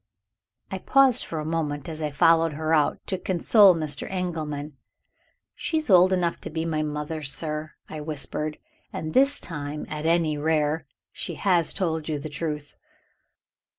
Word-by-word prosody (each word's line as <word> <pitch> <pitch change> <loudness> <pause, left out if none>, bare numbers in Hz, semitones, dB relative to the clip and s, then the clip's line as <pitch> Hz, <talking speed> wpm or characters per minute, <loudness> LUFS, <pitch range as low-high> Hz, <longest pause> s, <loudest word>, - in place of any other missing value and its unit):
I 190 - -3
paused 265 +2 +4
for 160 - -4
a 150 - -4
moment, 150 -3 -2
as 160 -1 -6
I 150 - 0
followed 165 +2 +4
her 155 +2 -1
out, 150 -2 +3
to 190 - -2
console 190 +2 +5
Mr. 155 -4 -4
Engelman. 155 -6 -3 0.8
"She 320 - -2
is 310 -8 -1
old 185 0 +7
enough 175 -2 0
to - - -6
be 160 +1 -3
my 155 -2 0
mother, 150 +1 -3
sir," 150 +2 -4
I 155 - -6
whispered; 150 0 -3 0.3
"and 155 0 -5
this 275 +2 +4
time, 150 -3 -5
at 155 +1 -3
any 165 -3 +2
rare, 150 -1 +1 0.2
she - - -6
has 175 -5 +2
told 160 -4 -2
you 155 - 0
the 150 +2 -6
truth." 150 -1 -4
160 Hz, 160 wpm, -25 LUFS, 150-170 Hz, 0.8 s, old